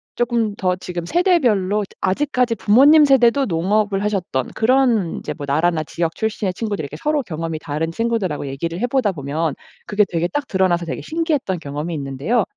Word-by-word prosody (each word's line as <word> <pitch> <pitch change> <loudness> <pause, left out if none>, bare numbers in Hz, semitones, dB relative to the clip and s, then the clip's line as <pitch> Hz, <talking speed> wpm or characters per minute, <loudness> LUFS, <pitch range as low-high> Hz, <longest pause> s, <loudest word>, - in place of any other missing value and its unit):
쪼끔 235 -3 0
더 185 -2 0
지금 175 -2 -6
세대별로 235 - +2
드 - - -20
아직까지 250 +3 +1
부모님 285 +10 +6
세대도 270 0 +4
농업을 200 +2 0
하셨던 185 -11 -1
그런 235 -6 +2
인제 - - -5
뭐 145 - -7
나라나 160 +3 +1
지역 165 +1 -3
출신의 215 -3 -2
친구들 205 -3 -3
이렇게 140 +1 -7
서로 300 -2 0
경험이 165 -3 -4
다른 155 +2 -3
친구들하고 195 -8 -2
얘기를 165 +6 -4
해 245 - +1
보다 245 -5 +1
보면 145 0 -2 0.3
그게 210 0 +3
되게 170 0 0
딱 280 +10 -3
드러나서 185 -3 +1
되게 - - -5
신기했던 310 - -1
경험이 150 +2 -5
있는데요. 140 - -1
195 Hz, 415 characters per minute, -20 LUFS, 165-240 Hz, 0.3 s, 부모님